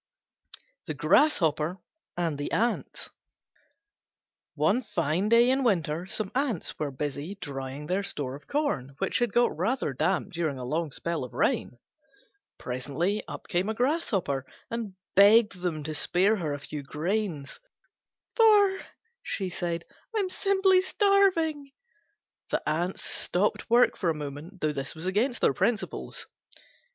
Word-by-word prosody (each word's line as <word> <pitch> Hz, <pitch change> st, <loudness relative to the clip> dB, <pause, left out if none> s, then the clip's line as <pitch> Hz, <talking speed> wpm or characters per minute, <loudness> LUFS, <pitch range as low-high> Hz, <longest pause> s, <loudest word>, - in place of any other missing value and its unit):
THE -, -, -3 dB
GRASSHOPPER 170 Hz, -, +3 dB, 0.4 s
AND 165 Hz, -5 st, -1 dB
THE 145 Hz, -, -3 dB
ANTS 235 Hz, +2 st, -1 dB, 1.4 s
One 160 Hz, -, +2 dB
fine 185 Hz, -, -1 dB
day 235 Hz, +2 st, +6 dB
in 265 Hz, +1 st, +1 dB
winter 175 Hz, -6 st, 0 dB
some 215 Hz, -1 st, -2 dB
Ants 255 Hz, -, -1 dB
were 150 Hz, -, -1 dB
busy 145 Hz, +6 st, -4 dB
drying 140 Hz, -4 st, -6 dB
their 185 Hz, +5 st, 0 dB
store 145 Hz, -9 st, -2 dB
of 140 Hz, -, -11 dB
corn, 210 Hz, -, -1 dB
which -, -, 0 dB
had 240 Hz, -3 st, +1 dB
got 240 Hz, +3 st, +3 dB
rather 185 Hz, -, -1 dB
damp 160 Hz, +8 st, 0 dB
during 160 Hz, -5 st, -1 dB
a 125 Hz, -, -5 dB
long 160 Hz, +5 st, -1 dB
spell 165 Hz, +2 st, -3 dB
of 125 Hz, -, -9 dB
rain. -, -, 0 dB, 0.8 s
Presently 145 Hz, +11 st, -2 dB
up -, -, -8 dB
came 180 Hz, +3 st, 0 dB
a 220 Hz, -, -2 dB
Grasshopper 220 Hz, -, 0 dB, 0.3 s
and 225 Hz, -5 st, -4 dB, 0.2 s
begged 205 Hz, -1 st, +6 dB
them 165 Hz, -4 st, -2 dB
to 155 Hz, +1 st, -4 dB
spare 190 Hz, +7 st, +2 dB
her 160 Hz, -6 st, -2 dB
a 145 Hz, -, -2 dB
few 145 Hz, +1 st, -6 dB
grains, 155 Hz, +1 st, -3 dB, 0.8 s
"For," 415 Hz, -4 st, +5 dB, 0.4 s
she 190 Hz, -3 st, -3 dB
said, 170 Hz, -1 st, -3 dB, 0.3 s
"I'm 385 Hz, -3 st, 0 dB
simply 385 Hz, -1 st, +3 dB
starving." 370 Hz, -8 st, +2 dB, 0.8 s
The -, -, -2 dB
Ants 170 Hz, +5 st, -1 dB
stopped 200 Hz, +5 st, -1 dB
work 240 Hz, +2 st, +5 dB
for 175 Hz, -, 0 dB
a 160 Hz, -, 0 dB
moment, 150 Hz, +6 st, -7 dB
though 155 Hz, -1 st, +1 dB
this 140 Hz, +1 st, -4 dB
was 160 Hz, +2 st, -6 dB
against 225 Hz, +7 st, 0 dB
their -, -, +4 dB
principles. 220 Hz, -, -2 dB
180 Hz, 140 wpm, -28 LUFS, 150-235 Hz, 1.4 s, day